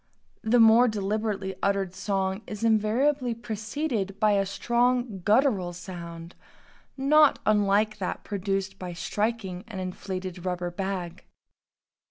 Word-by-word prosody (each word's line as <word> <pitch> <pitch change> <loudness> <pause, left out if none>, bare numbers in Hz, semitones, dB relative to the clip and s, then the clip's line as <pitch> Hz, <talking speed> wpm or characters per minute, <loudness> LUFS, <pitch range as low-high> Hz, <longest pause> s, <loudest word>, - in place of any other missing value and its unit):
The 235 +2 +3
more 225 +2 +7
deliberately 205 -2 -2
uttered 195 -2 0
song 190 0 -1
is 210 +1 -6
invariably 235 +4 +2
preceded 220 -2 -3
by 215 -1 +4
a 195 -1 +2
strongly 240 0 0
guttural 205 -3 +2
sound 170 -1 -8 0.6
not 295 +2 +5
unlike 210 0 +2
that - - -3
produced 195 -1 -3
by 180 -1 -5
striking 200 +1 -2
an 215 -4 -8
inflated 185 -1 -5
rubber 180 -1 -2
bag. 185 -2 -4
200 Hz, 115 wpm, -27 LUFS, 185-225 Hz, 0.6 s, more